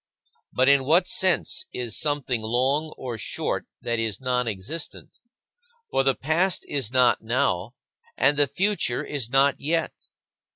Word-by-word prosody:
But 130 +1 +2
in 140 -1 +5
what 165 +7 +4
sense 185 -2 +2
is 120 -4 -3
something 145 -6 0
long 130 +7 0
or 120 -4 -6
short - - -3 0.2
that 120 -1 -1
is 110 -3 -2
nonexistent? 125 - -4 0.7
For - - +2
the 135 0 +2
past 170 +6 0
is 135 -6 -2
not 125 -1 +3
now, 115 -3 -1 0.4
and 140 +2 +3
the 145 0 +3
future 195 -11 0
is 135 -6 -3
not 135 +2 +3
yet. 165 +3 -1
135 Hz, 135 wpm, -24 LUFS, 120-145 Hz, 0.7 s, in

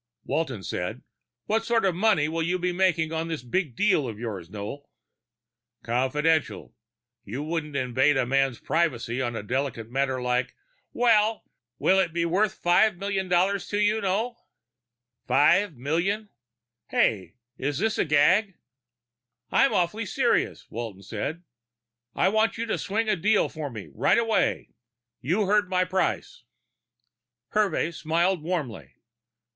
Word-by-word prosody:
Walton 130 -11 -2
said, 90 -1 -4 0.4
"What 220 +2 0
sort 230 -2 +1
of 190 - +2
money 185 -5 +2
will 165 +1 -2
you 175 +3 0
be 180 0 -1
making 175 -3 +1
on 160 +1 -2
this 160 -5 -4
big 135 +1 -2
deal 190 - +2
of 110 -3 -6
yours, 105 -7 -6
Noel?" 110 +8 -7 0.9
"Confidential! 145 +7 0 0.5
You 125 +8 -5
wouldn't 155 -2 -3
invade 130 +2 +2
a 130 - +2
man's 135 -1 +1
privacy 130 -7 -1
on 120 -2 -2
a 105 - -4
delicate 120 -1 -3
matter 135 0 0
like 125 0 -1 0.2
" - - -44
"Will 225 -2 +3 0.4
it 190 -3 +3
be 170 0 0
worth 190 +4 +1
five 180 +3 +3
million 195 0 -2
dollars 185 +2 +1
for 205 - -1
you, 210 +1 +2
Noel?" 215 +5 -2 0.8
"Five 155 +8 +3
million 175 - -1 0.6
hey, 95 -4 0 0.2
is 140 +1 -2
this 220 +3 0
a - - +4
gag?" 175 +7 +3 1.0
"I'm 275 - +4
awfully 195 +5 0
serious," 250 +1 0
Walton 110 -4 -6
said. 145 - -5 0.7
"I - - +3
want 220 +2 +1
you 230 - -2
to 225 - -2
swing 220 +3 -1
a 215 - +2
deal 205 +4 +2
for 155 -2 -5
me, 110 -5 -9
right - - +3
away. 225 -1 +1 0.5
You've 180 - +1
heard 205 -1 +2
my 185 -1 +2
price." 185 -6 -2 1.1
Hervey 210 -5 +1
smiled 170 +2 0
warmly. 125 - -4
165 Hz, 140 wpm, -26 LUFS, 130-200 Hz, 1.1 s, a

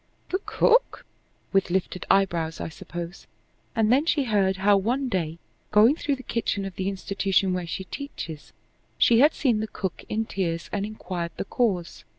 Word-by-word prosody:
"The 375 - +1
cook?" - - +3 0.5
with 195 -1 +3
lifted 185 0 -2
eyebrows, 170 -5 +2
I - - -4
suppose. 170 +3 -8 0.5
And 225 -1 +3
then 280 +6 +3
she 295 -4 +3
heard 200 -5 +2
how. 200 +1 +4
One 245 +7 0
day, 165 -6 -1 0.3
going 220 +7 +6
through 290 -3 -1
the 260 - -11
kitchen 205 -5 -1
of 195 - -5
the 190 +1 -1
institution 195 -1 0
where 180 -1 -2
she 190 - -4
teaches, 175 - -7 0.5
she 230 -1 +5
had 295 +4 +5
seen 240 -7 +2
the 220 - -2
cook 190 -4 -5
in 220 +1 0
tears 170 -5 -3
and 205 0 -1
inquired 180 -5 -5
the - - -3
cause. 195 -8 -1
195 Hz, 170 wpm, -26 LUFS, 180-230 Hz, 0.5 s, going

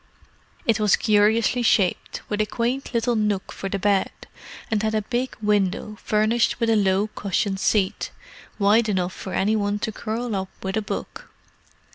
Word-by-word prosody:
It 225 -1 +2
was 210 -2 +4
curiously 220 +3 +3
shaped, 200 -5 +1
with 210 0 -1
a 215 - 0
quaint 245 +5 -2
little 235 0 +1
nook 210 -3 -1
for 195 - -5
the 200 - -1
bed, 195 0 +2 0.6
and 215 -2 +1
had 220 0 0
a 215 - 0
big 250 +4 -2
window 210 0 0
furnished 215 +3 +1
with 230 -1 +2
a - - +4
low 195 -1 +2
cushioned 195 0 -1
seat, 195 -2 +1 0.5
wide 215 +2 +3
enough 185 -2 0
for 190 - -7
any 210 +3 +2
one 205 -1 0
to 220 - -3
curl 225 +1 -3
up 190 -1 -3
with 190 0 -2
a 220 - +1
book. 205 - -6
210 Hz, 170 wpm, -23 LUFS, 200-225 Hz, 0.6 s, was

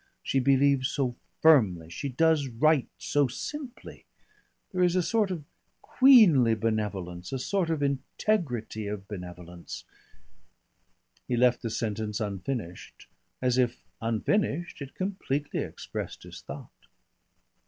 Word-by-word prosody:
She 135 - +1
believes 135 0 +3
so 130 -4 -1 0.3
firmly, 100 - +5
she 140 +11 -4
does 155 +1 +2
right 135 +4 +2
so 145 -2 +1
simply, 260 - -7 0.7
there 185 - -1
is 180 0 +3
a 185 - +3
sort 215 +1 +1
of 175 -5 -4 0.4
queenly 190 - +6
benevolence, 100 -6 -3
a 135 - -1
sort 175 +6 -1
of 155 -3 0
integrity 135 - -1
of 100 -1 -5
benevolence 90 -3 -8 0.7
" - - -42
He 120 - 0
left 125 0 +3
the 115 - -3
sentence 110 -1 -2
unfinished, 100 -2 -5 0.4
as 125 0 +2
if 125 -1 0 0.2
unfinished 155 - 0
it 140 -1 -8
completely 165 -7 -2
expressed - - -6
his - - -10
thought. - - -11
130 Hz, 120 wpm, -28 LUFS, 110-160 Hz, 0.7 s, queenly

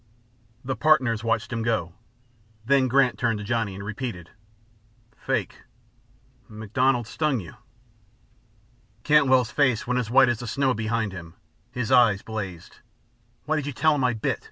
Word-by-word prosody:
The 130 0 -2
partners 130 -8 +2
watched 115 +1 -1
him 115 - -2
go, 110 -7 -1 0.7
then 135 +1 +3
Grant 130 0 +2
turned 115 -3 0
to 105 - -7
Johnny, 115 -3 -2
and 100 +1 -8
repeated: 105 -5 -6 0.8
"Fake! - - -3 0.9
MacDonald 120 +4 0
stung 145 +2 -1
you." 85 -5 -10 1.5
Cantwell's 130 -6 +3
face 130 -6 +1
went 125 0 0
as 115 -3 -3
white 130 +2 +5
as 120 -2 0
the 120 - -7
snow 135 +2 +1
behind 110 -1 -2
him, 85 -2 -10 0.4
his 125 -2 -3
eyes 115 -6 +4
blazed. 100 -6 -7 0.7
"Why 155 +1 0
did 145 -2 -3
you 145 - -4
tell 155 +4 +2
him 145 -3 -1
I 125 -1 +2
bit?" 110 - -2
120 Hz, 150 wpm, -24 LUFS, 110-130 Hz, 1.5 s, white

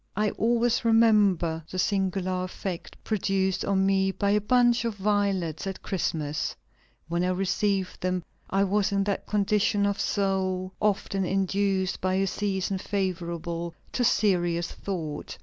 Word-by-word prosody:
"I 210 +1 +1
always 235 +1 +1
remember 205 -8 +3
the 185 - -6
singular 185 -1 0
effect 185 -1 -6
produced 195 -3 0
on 190 -1 +2
me 195 0 +3
by 200 +1 0
a 210 +1 +3
bunch 240 +2 +3
of 230 -2 -2
violets 195 -5 0
at 190 -1 -5
Christmas; 155 -5 -2 0.5
when 170 +1 0
I 180 - +1
received 195 +1 0
them 185 -1 -1 0.3
I 195 +1 +2
was 200 +1 +1
in 200 0 +2
that 200 0 -2
condition 205 0 +2
of 200 0 0
soul 190 -2 0
often 200 -2 0
induced 195 0 0
by 185 0 +1
a 195 +1 +2
season 195 -1 -1
favorable 170 -4 -3 0.2
to 250 - 0
serious 175 -7 +2
thought. 160 -7 -5
195 Hz, 140 wpm, -27 LUFS, 185-205 Hz, 0.5 s, remember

